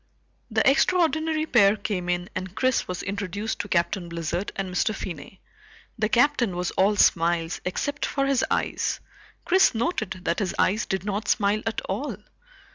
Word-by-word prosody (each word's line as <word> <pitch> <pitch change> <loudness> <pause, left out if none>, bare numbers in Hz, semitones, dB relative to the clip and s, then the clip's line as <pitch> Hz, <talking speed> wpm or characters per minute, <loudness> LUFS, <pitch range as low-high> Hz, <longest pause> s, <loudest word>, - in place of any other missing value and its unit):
The - - +2
extraordinary 315 +1 +2
pair 210 -8 +5
came 195 -4 -3
in 175 0 -1
and 185 +1 -5
Chris 255 -1 +1
was 180 -1 -4
introduced 200 +2 -3
to - - -3
Captain 175 0 0
Blizzard 170 +3 -3
and 195 -1 -3
Mr. 215 +4 +1
Finney. 175 0 -8 0.5
The 215 -2 0
Captain 245 -5 +2
was 180 0 -2
all 200 +2 +2
smiles 170 -3 +2
except 285 +10 -2
for 275 -1 0
his 275 -2 +2
eyes; - - -1 0.5
Chris 375 -7 +4
noted 220 - -2
that 170 - 0
his 195 -4 -2
eyes 215 +4 +1
did 190 -2 -2
not 205 +1 -2
smile 210 -1 +2
at 225 - -1
all. - - -4
200 Hz, 160 wpm, -25 LUFS, 180-245 Hz, 0.5 s, pair